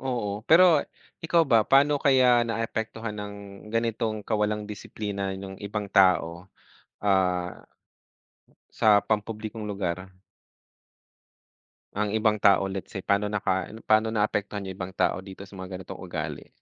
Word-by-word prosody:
oo 110 -6 -3
pero 165 -2 +7 0.4
ikaw 165 +1 +4
ba 120 -6 +4
paano 145 +1 +4
kaya 130 -3 +5
naapektuhan 115 -1 -3
ng 105 0 -6 0.4
ganitong 115 -2 -1
kawalang 105 -1 -1
disiplina 100 -1 -5
nung 95 0 -8
ibang 105 0 -4
tao? 90 -1 +3 0.6
Ah 90 -3 +1 1.1
Sa 110 - +3 0.2
pampublikong 110 0 -3
lugar? 95 -4 -2 2.0
Ang 105 +1 0
ibang 110 -1 +1
tao 100 -1 +5
let's 95 -1 -5
say 95 - -7
pano 100 +1 +1
naka 95 -2 -1
ano 110 +1 -12
pano 110 +1 +3
naapektuhan 105 -2 -1
yung 95 - -5
ibang 95 0 -5
tao - - +1
dito 95 0 -10
sa 100 - -18
mga 95 0 -6
ganitong 95 - -9
ugali? - - -5
105 Hz, 130 wpm, -26 LUFS, 95-115 Hz, 2.0 s, pero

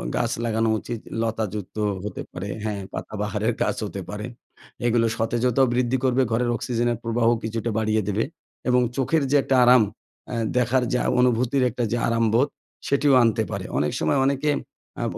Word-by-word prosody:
গাছ - - 0
লাগানো 115 0 +1
উচিত 115 -2 -5 0.2
লতাযুক্ত 110 -3 -3 0.3
হতে 105 - -5
পারে 100 +3 -6
হ্যাঁ, 105 -2 -2
পাতাবাহারের 105 +2 -2
গাছ - - +1
হতে 100 -1 -5
পারে 105 +1 -5 0.6
এগুলো 115 -1 +3
সতেজতাও 120 +3 +2
বৃদ্ধি 125 +1 +1
করবে, 130 0 +3
ঘরের 120 +1 +1
অক্সিজেনের 120 0 -1
প্রবাহও 115 +1 +2
কিছুটা 115 +1 -2
বাড়িয়ে 110 0 +1
দেবে 105 +2 +1 0.5
এবং 125 0 +4
চোখের 140 +3 +1
যে - - +4
একটা 135 - +1
আরাম 125 -2 +7 0.5
আ - - -2 0.2
দেখার 125 +1 +2
যে 125 - +2
আ - - +2
অনুভূতির 125 +2 +2
একটা 120 +1 -3
যে 120 - +1
আরামবোধ 115 +3 +2 0.4
সেটিও 140 0 +3
আনতে 115 -2 +2
পারে। - - -4
অনেক 75 0 +1
সময় 140 - +1
অনেকে 140 +2 +1 0.5
আ - - -1
115 Hz, 160 wpm, -24 LUFS, 110-125 Hz, 0.6 s, আরাম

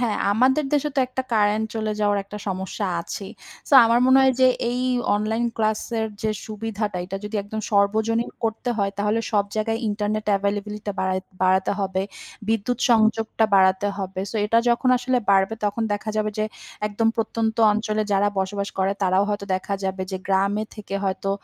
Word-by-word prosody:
হ্যাঁ, 230 -4 0 0.2
আমাদের 260 +7 +3
দেশে 295 0 +2
তো - - +4
একটা 260 +1 -3
কারেন্ট 215 0 +2
চলে 215 -1 -1
যাওয়ার 205 -1 +2
একটা 210 +1 -8
সমস্যা 190 +2 -3
আছেই। 195 +3 -7 0.4
সো - - -10
আমার 230 +1 +4
মনে 260 +1 +6
হয় 265 0 +5
যে 255 - +7 0.2
এই 250 +1 -2 0.3
অনলাইন 220 +3 0
ক্লাস 215 -1 +1 0.2
এর 220 - 0 0.2
যে 215 - +1 0.2
সুবিধাটা 215 -2 -3
এটা 190 +2 -5
যদি 210 +1 -4
একদম 215 +2 -5
সর্বজনীন 220 +3 +2
করতে 225 +2 -1
হয় 200 -1 +1
তাহলে 210 +2 +1
সব 205 -1 +3
জায়গায় 225 +1 0
ইন্টারনেট 210 +1 -2
এভেইলেবিলিটি 205 +1 -3
টা 205 - 0
বাড়াই 185 0 0 0.2
বাড়াতে 190 +1 +3
হবে। 190 -1 -1 0.5
বিদ্যুৎ 225 +2 0
সংযোগটা 225 0 +3
বাড়াতে 190 +1 +4
হবে। 190 -1 -4
সো 225 - -4
এটা 230 +2 +3
যখন 240 +2 +2
আসলে 250 0 +1
বাড়বে 195 +2 +3
তখন 210 +2 -1
দেখা 215 +1 -3
যাবে 215 0 0
যে 215 - +2 0.4
একদম 225 +2 0
প্রত্যন্ত 225 0 -1 0.2
অঞ্চলে 215 0 -1
যারা 200 +1 +3
বসবাস 200 +1 -2
করে 190 +1 +2
তারাও 190 +1 +3
হয়তো 205 -1 -2
দেখা 190 +2 -2
যাবে 190 0 -2
যে 190 - -2
গ্রামে 200 +2 +1
থেকে 205 -2 -7
হয়তো 195 0 -1
210 Hz, 180 wpm, -23 LUFS, 200-225 Hz, 0.5 s, যে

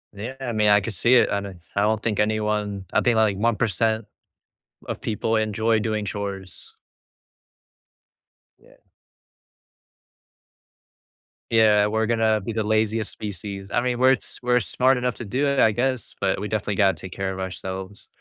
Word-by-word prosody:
Yeah, 115 +6 -6
I 130 -2 -3
mean, 105 -2 +2
I 105 0 +6
could 105 +2 -4
see 115 +8 +3
it. 125 - +5
I 100 - 0
don 95 -3 -9 0.2
I 100 - +2
don't 110 0 +1
think 110 -3 -1
anyone 105 -2 -1
I - - +3
think 120 -2 +2
like 110 -3 +3
1% 110 0 +1 0.8
of - - -5
people 110 +1 -1
enjoy 110 +1 +1
doing 110 -1 -2
chores. 100 -4 -6 1.8
Yeah. - - -22 2.7
Yeah, 105 -2 +5
we're 110 +1 0
gonna 110 -2 +2
be 105 - -4
the 110 0 -1
laziest 110 0 0
species. 100 -1 -7
I 120 - +2
mean, 125 -1 -1
we're 130 +1 +6
s - - -6
we're 125 0 +3
smart 130 +3 +2
enough 125 -1 -1
to 120 - -7
do 130 +8 -1
it, 140 -1 +1
I 110 - +5
guess, 130 +2 -2
but 95 -1 0
we 105 - -3
definitely 105 -1 -2
gotta 95 -1 +3
take 95 - -9
care 95 0 -3
of 95 - -6
ourselves. 95 +1 -6
110 Hz, 165 wpm, -23 LUFS, 100-115 Hz, 2.7 s, I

